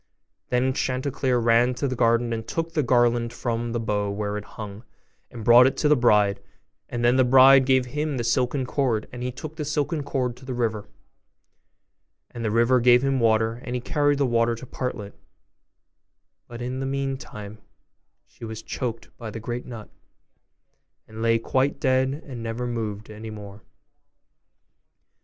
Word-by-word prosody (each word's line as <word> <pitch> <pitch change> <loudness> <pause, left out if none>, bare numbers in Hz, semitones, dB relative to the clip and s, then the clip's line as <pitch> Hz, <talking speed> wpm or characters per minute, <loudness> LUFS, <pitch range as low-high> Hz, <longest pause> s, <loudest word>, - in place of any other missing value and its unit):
Then 130 +1 +1
Chanticleer 130 -1 -1
ran 120 +1 +3
to 140 - -1
the 130 - -2
garden, 115 0 +2
and 110 0 -5
took 165 0 -3
the 155 - +2
garland 120 -2 +2
from 120 -1 -3
the 120 - -1
bough 105 -2 -1
where 105 0 -3
it 105 0 -5
hung, 105 0 -7 0.5
and 120 -3 -9
brought 120 +2 +8
it 130 - -2
to 150 - +1
the 150 - +5
bride; 105 -5 +3 0.5
and 120 -1 -2
then 120 +2 +4
the 130 - +5
bride 130 +1 +7
gave 130 -1 +3
him 150 +2 -3
the 120 - -2
silken 125 +3 0
cord, 125 -5 -1
and 125 - -8
he 125 +1 -2
took 155 +5 -9
the 155 - -3
silken 150 +1 -1
cord 130 -3 -2
to - - -16
the 130 -1 -5
river, 110 -3 -2 1.4
and 120 - -7
the 110 - 0
river 115 +3 +3
gave 120 +1 +5
him 135 -1 +1
water, 115 +1 +1
and 125 - -4
he - - -1
carried 145 +3 +1
the 140 - +2
water 115 -1 +1
to 115 - -10
Partlet; 120 -5 -5 1.3
but 120 0 -8
in 125 +1 -4
the 135 - -2
meantime 135 -6 -5 0.7
she - - -18
was 110 -1 -6
choked 115 -3 -5
by 115 -2 -6
the 115 - -7
great 120 +2 -5
nut, 115 -4 -8 1.2
and 110 0 -9
lay 115 0 +3
quite 130 +4 0
dead, 130 +2 +1
and 125 -4 -8
never 115 +2 -4
moved 110 -3 -4
any 110 +1 -8
more. 105 -1 -10
120 Hz, 175 wpm, -24 LUFS, 115-130 Hz, 1.4 s, brought